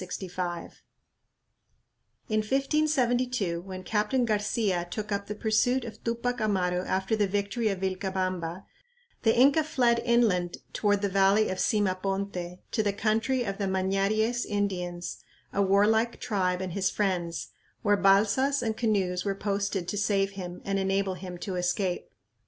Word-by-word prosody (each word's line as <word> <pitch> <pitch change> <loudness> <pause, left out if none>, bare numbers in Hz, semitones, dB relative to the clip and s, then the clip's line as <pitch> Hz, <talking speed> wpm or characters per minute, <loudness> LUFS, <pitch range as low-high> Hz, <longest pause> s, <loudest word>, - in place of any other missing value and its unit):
In 215 0 +1
1572, 250 - +1
when 185 0 -8
Captain 215 +6 +1
Garcia 205 -4 0
took 215 +1 -5
up 200 0 -2
the 210 - -4
pursuit 235 +4 +1
of 225 - -9
Tupac 235 +1 -1
Amaru 180 -4 +1
after 190 +3 0
the 210 -2 +2
victory 205 +4 -1
of 195 -3 -1
Vilcabamba, 185 -2 -2 0.6
the 225 0 +3
Inca 280 +5 +5
fled 245 -6 +2
"inland 215 -8 +2 0.2
toward 205 -1 +1
the - - +3
valley 195 +2 +3
of 185 - -3
Sima 200 -5 +1
ponte... 195 -2 -3
to 220 - +1
the 205 -2 0
country 225 +5 +1
of 195 -2 -4
the 200 - 0
Mañaries 195 +5 +1
Indians, 180 -4 -3 0.3
a 200 - +1
warlike 210 +4 +3
tribe 185 -6 0
and 185 -2 -4
his 190 0 +1
friends, 175 -5 -1 0.3
where 205 -1 +4
balsas 210 +8 +3
and 220 -2 -1
canoes 195 -6 0
were 200 -1 -1
posted 200 -2 -2
to 205 - -2
save 200 -1 +1
him 180 -2 -7
and 195 0 0
enable 195 0 0
him 180 -1 -7
to 185 +1 -4
escape." 180 +1 -1
200 Hz, 145 wpm, -28 LUFS, 185-220 Hz, 0.6 s, Inca